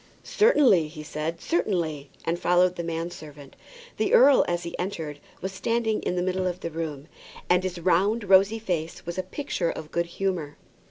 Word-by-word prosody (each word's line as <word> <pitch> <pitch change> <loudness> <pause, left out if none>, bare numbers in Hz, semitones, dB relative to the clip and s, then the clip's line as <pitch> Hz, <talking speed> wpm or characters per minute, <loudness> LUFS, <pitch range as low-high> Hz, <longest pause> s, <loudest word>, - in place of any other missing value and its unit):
"Certainly," 275 - +4
he 155 0 -9
said, 155 +2 -4
"certainly;" 165 - -1 0.2
and 170 +1 -1
followed 180 +1 +3
the 170 - -4
man 165 +1 -3
servant. 145 -4 -12 0.4
The - - +3
earl, 285 - +7
as 175 0 -1
he 170 - -6
entered, 160 -6 -4 0.2
was 190 - -3
standing 220 +2 -1
in - - -2
the 180 - 0
middle 185 0 0
of 180 +1 -4
the 170 - -4
room, 155 -3 -5 0.4
and 180 0 +5
his 185 -1 -4
round 190 +6 +2
rosy 195 +2 +5
face 175 -7 -4
was 175 +2 -4
a - - +2
picture 185 - -3
of 155 -1 -6
good 170 0 0
humour. 170 -5 -3
175 Hz, 180 wpm, -26 LUFS, 165-195 Hz, 0.4 s, earl